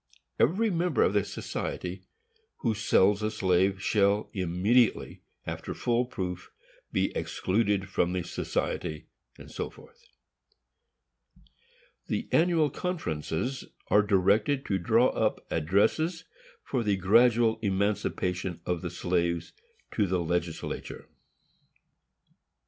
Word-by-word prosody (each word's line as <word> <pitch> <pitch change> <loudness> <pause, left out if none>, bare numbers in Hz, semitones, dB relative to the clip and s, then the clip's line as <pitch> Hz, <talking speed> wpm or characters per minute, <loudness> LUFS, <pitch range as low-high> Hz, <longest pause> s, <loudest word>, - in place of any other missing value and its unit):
Every 210 - +3
member 175 -2 +1
of - - +2
the 105 -1 +3
society 90 0 -5 0.6
who 115 - +1
sells 105 -1 +3
a 105 - 0
slave 95 -2 +1
shall, 100 0 +2
immediately 100 +6 +1 0.2
after - - -5
full 120 +1 +1
proof, 90 -6 -5 0.4
be - - 0
excluded 100 0 0
from 90 - 0
the 90 -1 -2
society, 80 -1 -3 0.4
&c. - - -5 2.4
The - - -2
Annual 160 -3 +3
Conferences 130 - -3 0.3
are 105 - +6
directed 105 +7 +2
to 95 -2 0
draw 115 +7 +4
up - - -1
addresses, 105 - +1 0.4
for 130 - -1
the 105 -3 +1
gradual 115 +4 +4
emancipation 95 -3 -1
of 90 -2 -1
the 90 - -3
slaves, 85 -1 -1 0.4
to 105 -3 +1
the 90 +1 +1
legislature. 85 0 -4
100 Hz, 105 wpm, -28 LUFS, 90-120 Hz, 2.4 s, are